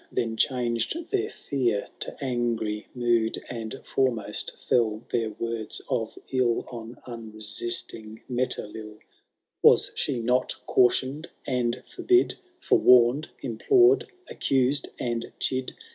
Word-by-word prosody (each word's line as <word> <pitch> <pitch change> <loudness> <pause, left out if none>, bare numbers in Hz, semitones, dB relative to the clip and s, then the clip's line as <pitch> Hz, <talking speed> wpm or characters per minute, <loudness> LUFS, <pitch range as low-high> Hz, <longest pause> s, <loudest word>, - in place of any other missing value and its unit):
Then 115 -1 -1
changed 120 - 0
their 405 +1 +1
fear 120 - -1
to - - -4
azigry 120 -5 -1
moed, 120 -2 +2
And 115 +2 -5
foremost 125 -6 -1
feU 115 -2 +1
their 115 -2 0
words 115 +1 -4
of 120 -5 -2
ill 125 -3 +1
On 115 0 -8
unresisting 110 -1 -3
Metelill: 110 -4 -3 0.6
Was - - +6
she 125 - -1
not 125 +2 +1
cautioned 130 +5 +2 0.2
and 125 -2 -1
forbid. 365 0 +2 0.2
Forewarned, 125 +4 +5
implored, 365 - +4 0.2
accused, 135 +1 +1
and 120 -1 -3
chid. 130 0 -1
120 Hz, 105 wpm, -26 LUFS, 110-130 Hz, 0.6 s, Was